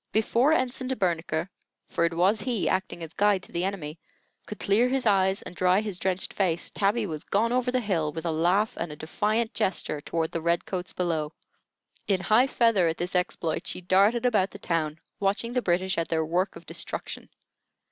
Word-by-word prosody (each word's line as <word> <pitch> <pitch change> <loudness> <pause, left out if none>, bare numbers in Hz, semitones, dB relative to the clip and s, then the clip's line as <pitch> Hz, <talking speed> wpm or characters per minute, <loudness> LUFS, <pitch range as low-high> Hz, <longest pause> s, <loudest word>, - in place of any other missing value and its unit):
Before 235 +6 +3
Ensign 255 -3 0
De 260 - 0
Bernicre 170 -4 -1 0.4
for 170 - +1
it 170 0 -1
was 195 +5 +3
he, 235 -3 -1
acting 185 -2 -1
as 165 0 -8
guide 205 -2 +2
to - - -13
the 170 - -1
enemy 170 -5 -4 0.5
could 210 - -6
clear 220 +5 +2
his 265 -1 0
eyes 195 -2 +3
and - - -7
dry 185 +2 +3
his 205 -4 -3
drenched 185 +1 -2
face, 175 -4 0
Tabby 210 +3 +1
was 155 -5 -5
gone 225 +4 +1
over 250 0 +1
the 255 - +1
hill 170 -8 0
with 160 +2 -6
a 165 - +1
laugh 180 +7 +2
and 170 -2 -3
a - - -7
defiant 215 +9 -1
gesture 155 -5 -1
toward 160 +1 -2
the 165 - -3
red 170 +1 +1
coats 180 -2 -4
below. 160 -4 -1 0.7
In 195 -2 +2
high 225 +7 +4
feather 230 -9 +3
at 165 - -1
this 180 +2 -4
exploit, 175 -3 -1
she - - -3
darted 200 +6 +3
about 210 -6 +3
the - - -10
town, 165 -5 -1 0.2
watching 205 +4 0
the 250 - +1
British 185 -1 +1
at 165 - -1
their 160 -1 0
work 180 +5 0
of - - -11
destruction. - - -5
185 Hz, 200 wpm, -27 LUFS, 170-215 Hz, 0.7 s, high